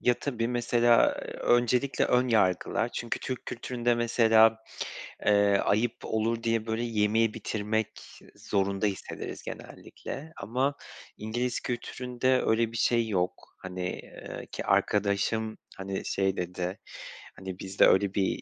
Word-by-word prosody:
Ya, 125 - +3
tabii, 120 -4 -1
mesela 120 -1 +4 0.3
öncelikle 120 +3 +2
ön 125 +1 +2
yargılar. 110 +1 +2
Çünkü 120 -1 -3
Türk 130 -1 -5
kültüründe 120 0 -1
mesela, 115 -1 +4 0.7
eee, 100 -1 +4
ayıp 110 +3 +2
olur 115 +1 -1
diye, 115 -1 0
böyle, 110 +1 -1
yemeği 110 0 +2
bitirmek 110 0 -3 0.2
zorunda 100 0 -1
hissederiz 100 -2 -4
genellikle. 155 +3 -8
Ama 130 +7 -1 0.4
İngiliz 120 +4 -2
kültüründe 125 +1 -1
öyle 115 0 +2
bir 115 - -5
şey 115 -1 +2
yok. 90 -4 -2
Hani, 90 -1 -5 0.3
ııı, - - -6
ki - - -6
arkadaşım, 105 +2 +1 0.2
hani, 95 0 -4
şey 95 0 0
dedi, 90 +2 -3 0.6
hani, 95 -1 -7
“Bizde 95 +1 +3
öyle 95 0 +3
bir 95 -2 0
110 Hz, 125 wpm, -28 LUFS, 100-120 Hz, 0.7 s, mesela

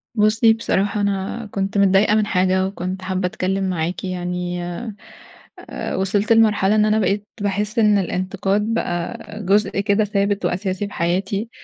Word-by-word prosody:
بُصّي 220 +2 +4
بصراحة 205 -2 -1
أنا 200 +3 -2
كنت 195 +1 -2
متضايقة 200 +2 +4
من 215 - +2
حاجة، 185 -1 +1
وكنت 185 -1 -5
حابّة 185 0 -2
أتكلّم 190 0 -2
معاكِ 175 0 -2
يعني، 180 -1 -3 1.0
آآ - - -5
وصلت 205 +3 +1
لمرحلة 215 -2 +3
إن 215 0 +4
أنا 215 0 +2
بقيت 200 +1 0
باحس 205 +2 0
إن 210 -2 +4
الإنتقاد 195 +2 -1
بقى 175 -6 -2 0.3
جزء 200 +1 +2
كده 200 +1 +2
ثابت 200 0 0
وأساسي 190 +2 -2
في 200 - -12
حياتي. 195 +5 -1
195 Hz, 145 wpm, -20 LUFS, 185-210 Hz, 1.0 s, بُصّي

